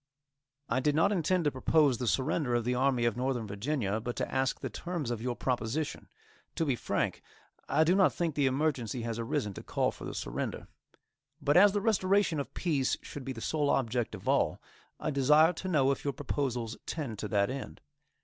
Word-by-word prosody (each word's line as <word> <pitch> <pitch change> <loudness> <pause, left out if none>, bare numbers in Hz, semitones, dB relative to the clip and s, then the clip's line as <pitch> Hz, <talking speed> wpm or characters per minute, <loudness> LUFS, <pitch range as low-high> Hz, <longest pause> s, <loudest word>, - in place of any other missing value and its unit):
I 125 - +1
did 145 +2 +1
not 165 +6 +4
intend 180 -1 +1
to 145 - +2
propose 135 0 +3
the 125 - -2
surrender 130 0 +1
of 120 - +1
the 125 - +1
Army 125 -1 +2
of 120 - +1
Northern 125 -2 -1
Virginia, 105 +1 -2
but 120 +2 -4
to - - -3
ask 130 0 0
the - - -3
terms 170 -8 -4
of 115 -2 -3
your 125 0 -2
proposition. 130 +5 -2 0.5
To 165 - 0
be 135 -4 +1
frank, - - -2 0.5
I 150 +4 +4
do 165 +3 +3
not 190 -1 +5
think 170 -3 -1
the 140 -1 +2
emergency 130 -4 -1
has 115 -1 -3
arisen 105 -3 -2
to - - -8
call - - 0
for - - -10
the - - -6
surrender. - - -4 0.7
But 145 - +1
as 195 +2 +7
the 205 - 0
restoration 195 -5 +2
of 140 - -4
peace 145 -7 0
should 145 - -8
be 135 - -4
the 115 -3 -7
sole 150 +1 0
object 120 -2 0
of - - -11
all, - - +2 0.4
I 155 - -2
desire 150 +5 +5
to 185 - -6
know 140 -6 +3
if 135 - -3
your 140 - -1
proposals 125 -4 -2
tend 130 -10 -4
to 105 - -3
that 100 +1 +1
end. 135 -1 -6
135 Hz, 205 wpm, -30 LUFS, 120-155 Hz, 0.7 s, as